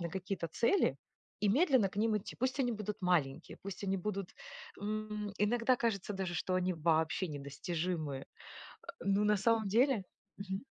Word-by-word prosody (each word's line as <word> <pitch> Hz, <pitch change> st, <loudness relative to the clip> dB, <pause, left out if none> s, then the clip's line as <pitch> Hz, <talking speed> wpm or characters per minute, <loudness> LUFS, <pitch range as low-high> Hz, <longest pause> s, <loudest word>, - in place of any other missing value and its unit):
на 170 Hz, -, -2 dB
какие-то 185 Hz, -1 st, -3 dB
цели 235 Hz, -, +2 dB, 0.4 s
и 210 Hz, -, +3 dB
медленно 260 Hz, -, +4 dB
к 200 Hz, -, -15 dB
ним 220 Hz, 0 st, +3 dB
идти. 210 Hz, -, -6 dB
Пусть 260 Hz, +2 st, 0 dB
они 245 Hz, -2 st, +2 dB
будут 210 Hz, -1 st, -4 dB
маленькие, 165 Hz, -4 st, +1 dB
пусть 200 Hz, 0 st, -6 dB
они 195 Hz, 0 st, +1 dB
будут, 195 Hz, -1 st, -3 dB, 0.5 s
м, 210 Hz, 0 st, -3 dB
иногда 230 Hz, +4 st, +3 dB
кажется 210 Hz, -4 st, -1 dB
даже, 190 Hz, -3 st, -3 dB
что 185 Hz, +2 st, -1 dB
они 185 Hz, 0 st, +1 dB
вообще 160 Hz, +2 st, +1 dB
недостижимые, 150 Hz, +1 st, -3 dB
э, -, -, -17 dB, 0.6 s
ну 200 Hz, +1 st, +3 dB
на 210 Hz, 0 st, +4 dB
самом 220 Hz, 0 st, +2 dB
деле, 240 Hz, +1 st, +3 dB, 0.4 s
мгм. 195 Hz, 0 st, -4 dB
200 Hz, 160 wpm, -34 LUFS, 175-215 Hz, 0.6 s, медленно